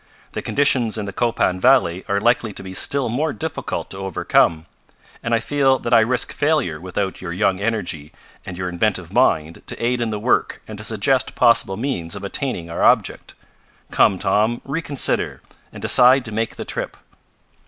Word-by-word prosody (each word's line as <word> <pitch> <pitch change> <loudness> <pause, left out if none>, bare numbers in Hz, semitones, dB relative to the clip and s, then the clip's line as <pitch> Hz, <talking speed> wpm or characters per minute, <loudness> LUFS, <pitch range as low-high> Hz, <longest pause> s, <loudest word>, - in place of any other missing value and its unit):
The - - -4
conditions 130 -6 +1
in 105 - -3
the 100 - -6
Copan 110 -5 0
valley 110 -7 +3
are 100 -1 +1
likely 115 -1 +1
to - - -7
be 95 -1 -8
still 140 +7 +1
more 145 +7 -1
difficult 160 -1 -5
to 95 - -6
overcome, 85 -3 +1 0.6
and 115 - -4
I 115 - +3
feel 135 +2 +2
that 120 -1 -3
I 115 - +8
risk 120 +2 0
failure 145 - 0
without 95 +1 -3
your 90 -2 -5
young 95 +1 0
energy 100 -9 -3 0.3
and 90 - -8
your 90 0 -3
inventive 90 -1 -1
mind 80 +1 +1
to - - -6
aid 120 +1 0
in 115 - -1
the 105 - -3
work 120 +4 0
and 110 - -8
to - - -7
suggest 115 +5 0
possible 105 -4 +3
means 110 -9 -3
of 100 - -8
attaining 100 -4 -3
our 85 - -5
object. - - +1 0.6
Come, 95 - +3
Tom, 105 +5 +1
reconsider, 145 -1 -2 0.3
and - - -11
decide 130 +1 +5
to 110 - -6
make 110 +1 -2
the - - -6
trip." - - -5
110 Hz, 180 wpm, -20 LUFS, 95-125 Hz, 0.6 s, I